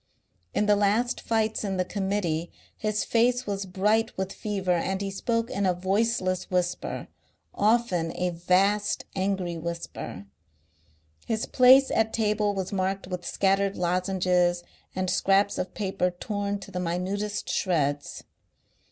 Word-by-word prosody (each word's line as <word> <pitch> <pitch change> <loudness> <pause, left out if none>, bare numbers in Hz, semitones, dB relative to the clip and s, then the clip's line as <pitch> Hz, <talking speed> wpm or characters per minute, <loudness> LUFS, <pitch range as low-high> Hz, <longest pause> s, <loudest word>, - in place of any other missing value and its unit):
In 210 - +2
the 210 0 +5
last 210 +4 +1
fights 220 -1 0
in 195 -2 -2
the 185 - +1
Committee 190 -4 -2 0.2
his 215 -1 -1
face 245 +2 +2
was 200 -1 -3
bright 210 +5 +1
with 190 0 -2
fever 195 -4 -2
and 185 +2 0
he 195 0 -3
spoke 230 +4 -1
in 200 -1 0
a 180 - +2
voiceless 190 0 0
whisper, 180 -1 -2 0.5
often 205 -6 +2
a 180 0 0
vast 195 +4 +1
angry 190 -3 -1
whisper. 170 - -6 1.0
His 220 -1 -1
place 260 +1 +6
at 220 0 +1
table 210 -2 +1
was 190 0 -3
marked 190 0 -1
with 180 -1 -5
scattered 195 0 +1
lozenges 180 0 +1 0.3
and 185 0 -1
scraps 195 +2 +2
of 180 - -4
paper 195 -3 0
torn 205 +2 -3
to 195 - -10
the 180 - -3
minutest 190 +4 -2
shreds. 145 -6 -1
195 Hz, 135 wpm, -27 LUFS, 180-210 Hz, 1.0 s, place